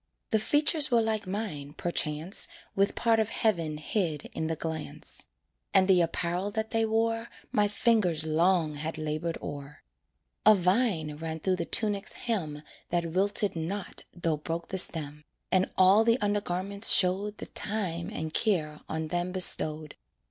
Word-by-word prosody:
The 220 Hz, -, +3 dB
features 295 Hz, +5 st, +2 dB
were 240 Hz, -2 st, +4 dB
like 220 Hz, -2 st, -2 dB
mine, 185 Hz, -8 st, -4 dB
perchance, 160 Hz, +1 st, 0 dB, 0.3 s
With 195 Hz, +1 st, +1 dB
part 230 Hz, -1 st, +2 dB
of 220 Hz, -1 st, 0 dB
heaven 170 Hz, -10 st, 0 dB
hid 155 Hz, -1 st, -2 dB
in 160 Hz, -, -3 dB
the 160 Hz, -, -1 dB
glance; 160 Hz, -1 st, -4 dB, 0.5 s
And 190 Hz, -1 st, +5 dB
the 185 Hz, -2 st, +5 dB
apparel 175 Hz, +3 st, -1 dB
that 220 Hz, +1 st, -3 dB
they 225 Hz, -1 st, +1 dB
wore 225 Hz, +1 st, 0 dB, 0.2 s
My 210 Hz, -1 st, +2 dB
fingers 205 Hz, -7 st, +1 dB
long 165 Hz, 0 st, +2 dB
had 155 Hz, +2 st, -4 dB
labored 155 Hz, +2 st, -3 dB
o'er. 145 Hz, 0 st, -8 dB, 0.6 s
A 215 Hz, -, +7 dB
vine 180 Hz, -5 st, +1 dB
ran 160 Hz, 0 st, -5 dB
through 185 Hz, +2 st, 0 dB
the 170 Hz, -, -3 dB
tunic's 205 Hz, -1 st, -1 dB
hem 160 Hz, -11 st, -3 dB, 0.3 s
That 170 Hz, -1 st, -1 dB
wilted 200 Hz, +2 st, +1 dB
not 180 Hz, +5 st, -5 dB
though 165 Hz, -3 st, -2 dB
broke 165 Hz, +3 st, -5 dB
the 190 Hz, -, 0 dB
stem, 150 Hz, -3 st, +1 dB, 0.3 s
And 185 Hz, 0 st, +2 dB
all 190 Hz, +4 st, +6 dB
the 230 Hz, +2 st, +2 dB
undergarments 200 Hz, 0 st, 0 dB
showed 200 Hz, +3 st, +4 dB
The -, -, -6 dB
time 185 Hz, -6 st, -2 dB
and 160 Hz, 0 st, -5 dB
care 155 Hz, -9 st, 0 dB
on 160 Hz, 0 st, -3 dB
them 175 Hz, +2 st, -2 dB
bestowed. 155 Hz, -4 st, +3 dB
180 Hz, 155 wpm, -28 LUFS, 160-210 Hz, 0.6 s, A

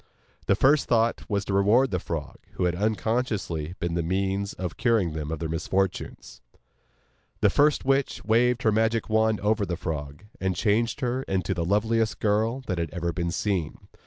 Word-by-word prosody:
Their 100 Hz, -, +4 dB
first 140 Hz, +7 st, +3 dB
thought 115 Hz, -1 st, +1 dB
was 100 Hz, -2 st, -1 dB
to 100 Hz, -, -3 dB
reward 110 Hz, +7 st, +4 dB
the 90 Hz, -, 0 dB
frog, 80 Hz, -3 st, -5 dB, 0.2 s
who -, -, -2 dB
had 90 Hz, -1 st, +2 dB
unconsciously 105 Hz, -5 st, -1 dB
been 85 Hz, 0 st, -2 dB
the 85 Hz, -, 0 dB
means 95 Hz, +3 st, -1 dB
of 90 Hz, -3 st, -5 dB
curing 110 Hz, -10 st, +1 dB
them 75 Hz, -1 st, -4 dB
of 80 Hz, -, -3 dB
their 80 Hz, +1 st, -3 dB
misfortunes. 85 Hz, -5 st, -3 dB, 1.0 s
The -, -, +4 dB
first 145 Hz, -1 st, +3 dB
witch 135 Hz, 0 st, 0 dB
waved 120 Hz, +2 st, +2 dB
her 110 Hz, -, +4 dB
magic 110 Hz, +1 st, +1 dB
wand 110 Hz, 0 st, +2 dB
over 105 Hz, +1 st, +1 dB
the 90 Hz, -4 st, -2 dB
frog, 75 Hz, -1 st, -5 dB, 0.2 s
and 95 Hz, -1 st, -1 dB
changed 115 Hz, -, +1 dB
her 125 Hz, 0 st, 0 dB
into 95 Hz, 0 st, -1 dB
the 85 Hz, -2 st, -2 dB
loveliest 110 Hz, +4 st, +1 dB
girl 110 Hz, +5 st, +1 dB
that 90 Hz, -9 st, -3 dB
had 85 Hz, -2 st, -2 dB
ever 85 Hz, -1 st, -2 dB
been 85 Hz, +1 st, -2 dB
seen. 90 Hz, -2 st, -2 dB
100 Hz, 180 wpm, -26 LUFS, 85-115 Hz, 1.0 s, Their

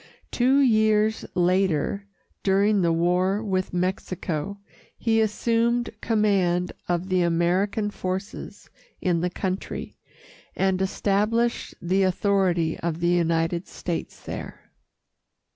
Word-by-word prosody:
Two 260 Hz, +3 st, +3 dB
years 220 Hz, -3 st, +3 dB
later, 185 Hz, +1 st, +1 dB, 0.3 s
during 200 Hz, +1 st, +3 dB
the 170 Hz, -1 st, +2 dB
war 180 Hz, +5 st, +1 dB
with 185 Hz, -3 st, -1 dB
Mexico, 180 Hz, 0 st, -2 dB, 0.4 s
he 225 Hz, -1 st, +2 dB
assumed 235 Hz, +2 st, +1 dB
command 195 Hz, -5 st, +1 dB, 0.2 s
of 175 Hz, +2 st, -1 dB
the 185 Hz, -1 st, +2 dB
American 180 Hz, +5 st, +1 dB
forces 190 Hz, +1 st, -5 dB, 0.3 s
in 175 Hz, -2 st, +1 dB
the 180 Hz, -, 0 dB
country, 185 Hz, +1 st, -4 dB, 0.6 s
and 190 Hz, -1 st, +1 dB
established 210 Hz, +5 st, 0 dB
the 185 Hz, +3 st, +1 dB
authority 185 Hz, -3 st, +1 dB
of 165 Hz, -1 st, -2 dB
the 170 Hz, 0 st, +1 dB
United 170 Hz, 0 st, +1 dB
States 170 Hz, -2 st, -5 dB
there. -, -, -8 dB
190 Hz, 105 wpm, -25 LUFS, 175-210 Hz, 0.6 s, Two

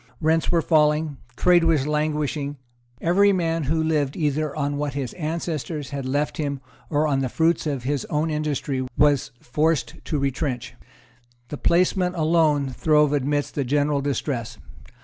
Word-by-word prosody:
Rents 160 Hz, +1 st, +1 dB
were 170 Hz, -2 st, +2 dB
falling; 150 Hz, -2 st, +2 dB, 0.2 s
trade 175 Hz, +3 st, +4 dB
was 160 Hz, -5 st, +2 dB
languishing; 150 Hz, -1 st, -1 dB, 0.4 s
every 200 Hz, +4 st, +4 dB
man 165 Hz, -4 st, 0 dB
who 160 Hz, +3 st, +1 dB
lived 150 Hz, -4 st, 0 dB
either 150 Hz, -2 st, -1 dB
on 145 Hz, -1 st, -1 dB
what 145 Hz, -2 st, -3 dB
his 135 Hz, -4 st, -3 dB
ancestors 155 Hz, -3 st, -4 dB
had 140 Hz, -2 st, -4 dB
left 145 Hz, +3 st, -1 dB
him 140 Hz, -3 st, -2 dB, 0.3 s
or 150 Hz, 0 st, +1 dB
on 140 Hz, -2 st, +1 dB
the 130 Hz, -1 st, -1 dB
fruits 165 Hz, +3 st, +1 dB
of 140 Hz, -4 st, -2 dB
his 140 Hz, 0 st, -1 dB
own 155 Hz, +2 st, -1 dB
industry 145 Hz, -3 st, -2 dB
was 145 Hz, -3 st, +3 dB
forced 155 Hz, +5 st, -1 dB
to 155 Hz, -, -1 dB
retrench. 135 Hz, -3 st, -2 dB, 0.8 s
The 150 Hz, -, -5 dB
placeman 180 Hz, +2 st, +2 dB
alone 155 Hz, -4 st, +2 dB
throve 150 Hz, +2 st, +3 dB
amidst 145 Hz, +1 st, 0 dB
the 140 Hz, -, -1 dB
general 145 Hz, +2 st, +1 dB
distress. 130 Hz, -5 st, -3 dB
150 Hz, 150 wpm, -23 LUFS, 140-160 Hz, 0.8 s, trade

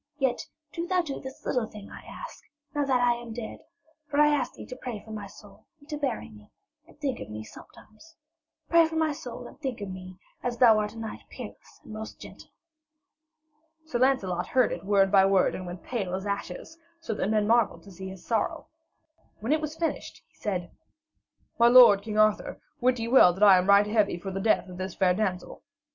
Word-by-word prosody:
Yet 265 Hz, -4 st, -1 dB, 0.3 s
do 340 Hz, +1 st, -4 dB
thou 365 Hz, -1 st, +2 dB
do 285 Hz, -4 st, -5 dB
this 265 Hz, 0 st, -10 dB
little 245 Hz, -3 st, 0 dB
thing 210 Hz, -2 st, -12 dB
I -, -, -10 dB
ask, -, -, -10 dB, 0.3 s
now 290 Hz, -1 st, 0 dB
that 260 Hz, -2 st, +2 dB
I 245 Hz, -1 st, +4 dB
am 235 Hz, -1 st, -8 dB
dead, 225 Hz, -1 st, -7 dB, 0.5 s
for 290 Hz, -1 st, -1 dB
I 300 Hz, 0 st, +6 dB
ask 270 Hz, -4 st, -1 dB
thee -, -, -9 dB
to 255 Hz, -, -8 dB
pray 245 Hz, -4 st, -6 dB
for 220 Hz, +2 st, -13 dB
my 210 Hz, -2 st, -6 dB
soul 200 Hz, 0 st, -17 dB
and 285 Hz, -, -20 dB
to 300 Hz, -, -3 dB
bury 280 Hz, -4 st, -2 dB
me, 105 Hz, -1 st, -16 dB, 0.4 s
and 340 Hz, -, -20 dB
think 280 Hz, -4 st, -2 dB
of 105 Hz, -, -8 dB
me 105 Hz, 0 st, -6 dB
sometimes. 215 Hz, -, -16 dB, 0.5 s
Pray 335 Hz, -1 st, +5 dB
for 320 Hz, -, -7 dB
my 320 Hz, -1 st, +2 dB
soul 245 Hz, -4 st, -8 dB
and -, -, -13 dB
think 265 Hz, -6 st, -4 dB
of 200 Hz, -2 st, -5 dB
me, 185 Hz, 0 st, -9 dB, 0.2 s
as 245 Hz, -1 st, -3 dB
thou 225 Hz, -4 st, +6 dB
art 210 Hz, 0 st, -2 dB
a -, -, -12 dB
knight 225 Hz, -1 st, -6 dB
peerless -, -, -11 dB
and -, -, -11 dB
most 220 Hz, 0 st, -8 dB
gentle.' -, -, -12 dB, 1.4 s
Sir 250 Hz, -6 st, -3 dB
Lancelot 200 Hz, -10 st, +1 dB
heard 255 Hz, -3 st, +2 dB
it -, -, -5 dB
word 195 Hz, -1 st, +3 dB
by 195 Hz, -2 st, +6 dB
word 195 Hz, -1 st, +3 dB
and 185 Hz, -, -6 dB
went 175 Hz, 0 st, -8 dB
pale 195 Hz, -7 st, -3 dB
as 190 Hz, +1 st, -5 dB
ashes, 200 Hz, -, -5 dB, 0.2 s
so 330 Hz, -9 st, -4 dB
that 205 Hz, -, -2 dB
men 215 Hz, -1 st, +2 dB
marvelled 230 Hz, 0 st, +2 dB
to 200 Hz, -, -13 dB
see 190 Hz, +1 st, -8 dB
his 190 Hz, -2 st, -11 dB
sorrow. 245 Hz, +8 st, -1 dB, 0.7 s
When 225 Hz, +6 st, -3 dB
it 310 Hz, -, +1 dB
was 305 Hz, +1 st, -5 dB
finished, 330 Hz, -1 st, -3 dB
he -, -, -35 dB
said: 180 Hz, -4 st, -3 dB, 0.9 s
'My 235 Hz, -, +7 dB
lord, 240 Hz, -5 st, +8 dB
King 215 Hz, 0 st, -5 dB
Arthur, 215 Hz, -1 st, +2 dB, 0.2 s
wit 250 Hz, +1 st, +2 dB
ye 230 Hz, 0 st, -3 dB
well 230 Hz, -8 st, +7 dB
that 190 Hz, +4 st, -1 dB
I 195 Hz, -3 st, +8 dB
am 185 Hz, +2 st, -2 dB
right 200 Hz, +1 st, +7 dB
heavy 210 Hz, -3 st, +1 dB
for 195 Hz, +2 st, -6 dB
the 195 Hz, +1 st, -3 dB
death 215 Hz, -2 st, +2 dB
of 180 Hz, -1 st, -10 dB
this 185 Hz, 0 st, -5 dB
fair 185 Hz, -2 st, +3 dB
damsel. 185 Hz, -2 st, -3 dB
220 Hz, 215 wpm, -27 LUFS, 195-260 Hz, 1.4 s, lord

